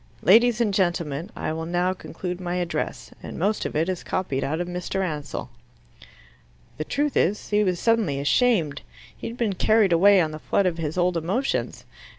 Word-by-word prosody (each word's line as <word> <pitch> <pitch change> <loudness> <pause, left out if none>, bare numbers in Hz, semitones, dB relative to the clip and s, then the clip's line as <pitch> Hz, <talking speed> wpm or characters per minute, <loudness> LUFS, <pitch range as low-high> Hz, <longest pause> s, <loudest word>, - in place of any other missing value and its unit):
Ladies 235 +3 +5
and 220 -4 +1
gentlemen, 170 -4 -1
I - - -3
will 160 0 -4
now 175 +2 +1
conclude 180 0 -6
my 175 0 -3
address. 175 -1 -3
And - - -8
most 205 +5 0
of - - -9
it 160 +3 +1
is 185 -2 -2
copied 140 -8 -2
out 155 +4 -2
of 175 - -2
Mr. 180 +2 -3
Ansell." 150 -6 -5 1.3
The 155 - -2
truth 290 - -1
is, 205 +5 +1
he 210 0 +3
was 180 -3 0
suddenly 220 -12 +1
ashamed. 160 - +2 0.3
He - - -7
had 230 - -7
been 225 -5 0
carried 210 0 +3
away 195 +3 +6
on 160 -3 +1
the 155 - -7
flood 200 - +1
of 175 -2 0
his 160 +1 -3
old 180 -1 +2
emotions. 195 - -2
180 Hz, 185 wpm, -24 LUFS, 160-205 Hz, 1.3 s, away